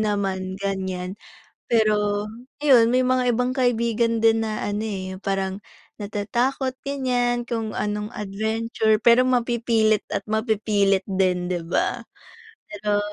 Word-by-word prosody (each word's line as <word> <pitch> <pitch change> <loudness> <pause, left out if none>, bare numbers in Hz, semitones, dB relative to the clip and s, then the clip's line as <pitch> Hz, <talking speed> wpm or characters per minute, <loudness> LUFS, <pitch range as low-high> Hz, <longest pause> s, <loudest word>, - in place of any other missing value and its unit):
naman 195 -3 -1
ganyan. 190 -1 -3 0.5
Pero 210 -2 +2 0.4
ayun 255 -6 +6
may 255 - +4
mga 255 -1 +2
ibang 250 +2 0
kaibigan 235 -2 +1
din 225 0 +5
na 215 -1 -3
ano 205 +1 -2
eh, 195 -3 -4
'yung 185 - -9
parang 195 -1 -1 0.4
natatakot 240 +6 -1
ganyan, 250 -3 0
kung 225 -2 -2
anong 210 +2 -3
adventure, 220 +2 0
pero 235 +3 +5
mapipilit 230 -3 +1
at - - -2
mapipilit 215 -3 +1
din, 185 -2 +1
'di 175 -2 -3
ba? 170 - -1 0.6
Pero 210 0 -1
215 Hz, 125 wpm, -23 LUFS, 200-235 Hz, 0.6 s, ayun